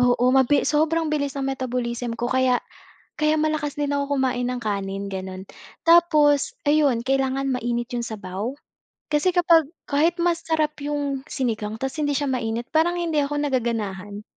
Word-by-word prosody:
Oo, 245 0 +3
mabi 265 +2 +4
sobrang 315 +1 +1
bilis 285 -2 -1
ng 275 - -2
metabolism 245 -2 -3
ko 240 - -3
kaya 255 0 +2 0.6
kaya 305 +1 +3
malakas 305 -1 -1
din 290 -1 -1
ako 285 0 0
kumain 250 -2 0
ng 250 - -2
kanin, 200 -2 -3
gano'n. 190 0 -6 0.4
Tapos 310 -4 +4
ayun, 290 -5 +3
kailangan 270 0 0
mainit 240 0 -2
yung - - -1
sabaw 215 +4 -5 0.5
kasi 325 +5 +2
kapag 335 -4 +5 0.2
kahit 310 +4 +2
masarap 325 -3 0
yung 285 -2 -2
sinigang 220 -7 -2
tapos 270 +4 -4
hindi 290 -1 0
siya 280 -1 0
mainit 235 -1 -2
parang 325 +3 +2
hindi 330 -3 -1
ako 285 +1 -2
nagaganahan. 215 -7 -2
270 Hz, 150 wpm, -23 LUFS, 240-300 Hz, 0.6 s, kapag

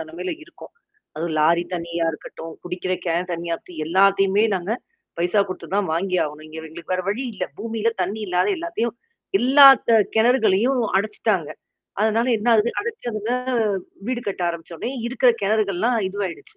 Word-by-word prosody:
நெலமையில 165 +3 -5
இருக்கோம். 340 - -14 0.4
அதுவும் 165 0 -2
லாரி 170 +3 +4
தண்ணியா 170 0 -2
இருக்கட்டும், 160 +1 -9
குடிக்கிற 180 +1 -4
கேன் 170 +2 0
தண்ணியா 170 0 -2
இருக்கட்டும், 165 -3 -9
எல்லாத்தையுமே 195 +3 +4
நாங்க 185 +3 -2 0.5
பைசா 175 +4 +2
குடுத்து 185 - -6
தான் 205 -1 +1
வாங்கி 180 +3 0
ஆவணும். 150 +1 -8
இங்க 155 +1 -9
எங்களுக்கு 170 +3 -7
வேற 185 - -1
வழி 215 +6 -1
இல்ல. - - -2
பூமியில 225 +1 -1
தண்ணி 200 +4 -3
இல்லாத 180 -1 +1
எல்லாத்தையும் 330 -10 -3 0.4
எல்லா 275 +3 +7 0.2
கெ 230 - +6 0.2
கெணறுகளையும் 230 +1 +3 0.2
அடைச்சுட்டாங்க. 200 -4 0 0.5
அதனால 220 +2 +2
என்னா 225 +3 +1
ஆகுது? 220 +2 +2
அடைச்சதுல 240 - -4 0.8
வீடு 250 -1 -1
கட்ட 195 -2 -3
ஆரம்பிச்சோன்னே 170 +5 -5 0.2
இருக்கற 245 +1 +3
கெணறுகள்லாம் 215 +2 +1
இதுவாயிடுச்சு. 190 -3 -6
195 Hz, 145 wpm, -22 LUFS, 170-225 Hz, 0.8 s, எல்லா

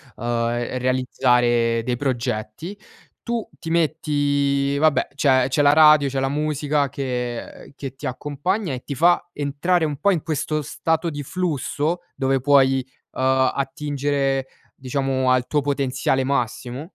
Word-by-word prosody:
uhm, 120 +1 -2
realizzare 125 -2 +2
dei 125 0 -1
progetti, 125 - -3 0.5
tu 235 -2 -3
ti 165 - -5
metti 145 -3 +1
vabbè, 155 0 +2
c'è 130 -3 +3
c'è 145 - +2
la 145 0 +5
radio, 155 -2 +6
c'è 135 0 -2
la 135 0 0
musica 150 -1 0
che 125 -1 -5
che 135 -2 -7
ti 145 - -9
accompagna 145 - -2
e 125 - -6
ti 140 - -5
fa 175 +4 +3
entrare 150 +5 0
un 150 -3 -1
po' 200 - +2
in 165 -5 0
questo 155 -1 -2
stato 160 +4 -1
di 145 -2 -5
flusso 165 0 -2
dove 135 -1 +1
puoi, 135 -2 +4 0.3
uhm, - - -4 0.3
attingere, 140 -1 -1 0.3
diciamo, 130 0 -1
al 125 -1 +2
tuo 150 -1 +1
potenziale 135 -1 0
massimo. 130 +1 -2
140 Hz, 140 wpm, -22 LUFS, 130-150 Hz, 0.5 s, radio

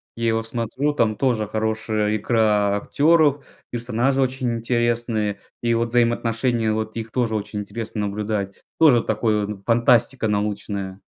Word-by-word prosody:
Я 115 0 0
его 115 0 +1
смотрю, 120 +6 -2
там 115 -6 +1
тоже 115 -4 0
хорошая 110 -1 -1
игра 105 -2 +2
актеров, 145 +4 +2 0.2
персонажи 120 +3 0
очень 130 -1 0
интересные 115 -3 -1 0.2
и 115 -1 +1
вот 115 0 0
взаимоотношения 115 -1 +1
вот 110 0 -3
их 115 -1 -5
тоже 115 -4 0
очень 105 0 -4
интересно 105 +1 -5
наблюдать. 100 -1 -3 0.3
Тоже 140 -8 +6
такой 105 -2 0
он 100 -1 -7
фантастика 120 +1 +3
научная. 100 -2 -3
115 Hz, 135 wpm, -22 LUFS, 105-120 Hz, 0.3 s, Тоже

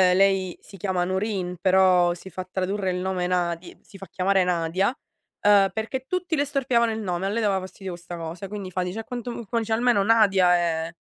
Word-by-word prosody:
lei 195 -2 +2
si 200 - -15
chiama 185 -1 -1
Nurine, 185 -1 -2
però 185 -2 +4
si 190 +1 -12
fa 185 +2 -5
tradurre 190 +1 -1
il 180 - -1
nome 180 -1 -1
Nadi 175 -1 -2
si 195 - -15
fa 195 - -9
chiamare 190 0 +1
Nadia, 180 +2 0
uhm, 205 -5 +1
perché 235 +5 -4
tutti 365 -3 -1
le 285 0 +1
storpiavano 250 -5 +1
il 220 - -3
nome, 185 -2 -2
a - - 0
lei 225 +2 -1
dava 195 -2 +2
fastidio 190 0 -8
questa 175 0 -8
cosa. 165 +4 -6
Quindi 195 -2 -6
fa 185 - -1
dice: 180 +5 -3
"A - - -11
quanto 245 0 -6
m" 235 -1 -6
fa 230 +4 -1
dice: 225 0 -2
"Almeno 235 -3 +3
Nadia 195 -4 +4
è" 165 -1 -1
190 Hz, 210 wpm, -24 LUFS, 180-215 Hz, -, però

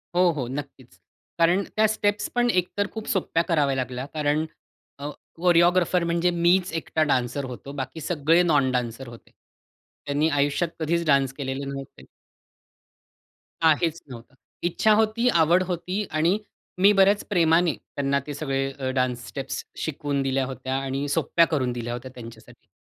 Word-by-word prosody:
हो, 180 0 +5
हो, 140 -6 -4
नक्कीच. 135 -1 -8 0.4
कारण 175 +4 +4
त्या 215 0 +4
स्टेप्स 210 -1 0
पण 245 0 +3
एक 180 -5 +2
तर 205 0 +1
खूप 220 -1 -6
सोप्या 170 -3 +1
कराव्या 150 -6 +1
लागल्या. 130 0 -3
कारण 150 0 0 0.5
अ, 145 +1 -4 0.3
कोरिओग्राफर 175 +1 +3
म्हणजे 170 +1 +1
मीच 175 +2 +2
एकटा 160 -1 0
डान्सर 130 -1 0
होतो. 130 +2 -8
बाकी 130 +3 -5
सगळे 165 +2 +2
नॉन 145 -6 +3
डान्सर 125 0 -3
होते. 120 -1 -13 0.7
त्यांनी 145 +2 +1
आयुष्यात 145 +3 +1
कधीच 170 +2 0
डान्स 140 -3 +3
केलेले 135 -1 -3
नव्हते. 135 - -8 1.6
काहीच 165 +1 +2
नव्हतं. 125 +2 -11 0.3
इच्छा 175 +5 +2
होती, 220 +3 +2
आवड 170 -2 +4
होती 185 +3 -2
आणि 165 +6 +2 0.4
मी 200 +2 +7
बऱ्याच 200 +1 +4
प्रेमाने 170 -3 +3
त्यांना 140 0 -2
ते 145 - -4
सगळे 135 -2 -2
अ, 135 -1 -4
डान्स 125 -1 -1
स्टेप्स 135 -1 -5 0.2
शिकवून 145 -2 -2
दिल्या 135 0 0
होत्या. 130 0 -4
आणि 135 +1 -3
सोप्या 165 +3 +3
करून 130 -6 0
दिल्या 120 0 -4
होत्या. 125 +2 -7
त्यांच्यासाठी 115 -2 -13
150 Hz, 150 wpm, -25 LUFS, 135-175 Hz, 1.6 s, मी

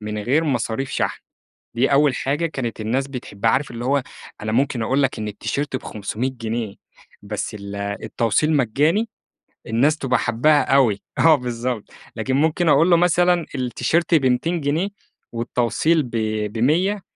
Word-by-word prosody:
من 105 0 -4
غير 130 +10 +1
مصاريف 130 -2 -1
شحن، - - -2 0.5
دي 125 +4 +1
أول 140 -1 +4
حاجة 145 +5 -1
كانت 130 -8 -4
الناس 125 +5 -1
بتحبّها 115 -5 -2
عارف 135 +1 0
اللي 120 +1 -6
هو 140 0 +2 0.4
أنا 110 0 -3
ممكن 130 +1 +1
أقول 135 +5 +1
لك 130 -3 -1
إن 105 - -3
التيشيرت 135 +7 -3
ب500 110 +2 -3
جنيه 115 -3 -4 0.5
بس 105 +1 -4
ال 100 -1 -7
التوصيل 105 +8 0
مجاني 150 - +2 0.6
الناس 135 +8 +2
تبقى 130 -3 0
حابّاها 145 +6 +3
أوي، 115 -8 +3 0.2
آه، 160 -1 +7
بالضبط، 125 -3 -3 0.3
لكن 130 - -2
ممكن 160 +3 +2
أقول 150 +4 +5
له 175 - +6
مثلًا 175 0 +3
التيشيرت 155 +6 +1
ب200 155 +4 +1
جنيه 155 +7 0 0.4
والتوصيل 120 +7 +1
ب 125 - -8 0.4
ب100 175 - +1
130 Hz, 145 wpm, -21 LUFS, 115-155 Hz, 0.6 s, آه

